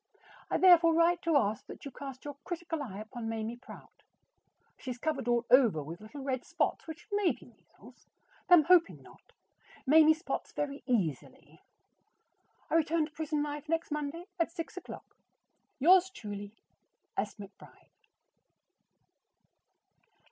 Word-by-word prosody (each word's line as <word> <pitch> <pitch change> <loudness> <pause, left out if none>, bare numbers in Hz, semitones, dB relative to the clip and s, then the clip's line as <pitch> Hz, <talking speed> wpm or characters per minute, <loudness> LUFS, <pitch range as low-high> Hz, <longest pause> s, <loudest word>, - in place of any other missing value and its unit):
I - - +1
therefore 340 -3 +6
write 340 +1 +3
to 330 -3 +3
ask 210 -5 -1
that - - -11
you 280 - -6
cast 270 0 -9
your 290 -1 -6
critical 340 -3 -4
eye 215 -9 -6
upon 225 +2 -6
Mamie 225 +1 -4
Prout. 245 - -14 0.7
She 260 - -9
is 250 - -4
covered 275 -2 -2
all 240 0 +2
over 235 - +5
with 165 +6 -9
little 265 +6 -9
red 260 -2 -2
spots - - -2
which 320 +2 -9
may 410 -3 +2
be - - -10
measles, - - -20 0.4
though 355 - +10
I - - +7
am 310 - +5
hoping 340 +1 +3
not. - - -19 0.5
Mamie 310 +2 +6
spots 320 - -5
very 285 -1 -3
easily. 185 - -3 1.1
I - - -6
return 325 0 +2
to 305 - -13
prison 305 -1 -2
life 295 0 -6
next 330 -1 -1
Monday 300 +3 -4
at 335 0 +1
six 330 -1 -6
o'clock. 365 - -10 0.6
Yours 365 +6 +5
truly, 205 - -8 0.6
S. - - -2
McBRIDE. 200 -2 -14
290 Hz, 150 wpm, -31 LUFS, 240-330 Hz, 1.1 s, though